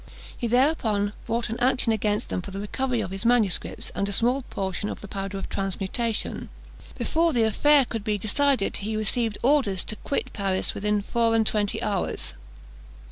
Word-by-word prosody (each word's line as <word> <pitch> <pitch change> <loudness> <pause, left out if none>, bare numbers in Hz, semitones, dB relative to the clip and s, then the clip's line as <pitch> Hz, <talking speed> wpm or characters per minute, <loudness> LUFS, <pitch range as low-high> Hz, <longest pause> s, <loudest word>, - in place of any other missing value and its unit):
He 240 - -2
thereupon 225 -5 +2
brought 230 0 -1
an 230 - -3
action 250 -1 +2
against 210 0 0
them - - -1
for 190 - -8
the 195 0 -5
recovery 245 +3 -1
of 185 -3 -4
his 195 +2 -4
Mss. 230 -6 +1
and 200 - -1
a - - -2
small 245 +6 +3
portion 195 +1 -3
of - - -5
the 205 - -9
powder 195 0 -4
of 195 - -5
transmutation. 195 +4 -1 0.5
Before 330 +1 +2
the 235 -3 +3
affair 280 +6 +5
could 225 -3 -4
be 210 -1 0
decided, 260 +3 +1
he 215 +2 -3
received 215 0 0
orders 250 -9 +3
to 215 - -5
quit 280 - -3
Paris 195 -2 0
within 210 0 0
four 230 +1 +1
and 225 -1 +3
twenty 210 -2 0
hours. 200 -3 -1
215 Hz, 180 wpm, -25 LUFS, 200-240 Hz, 0.5 s, affair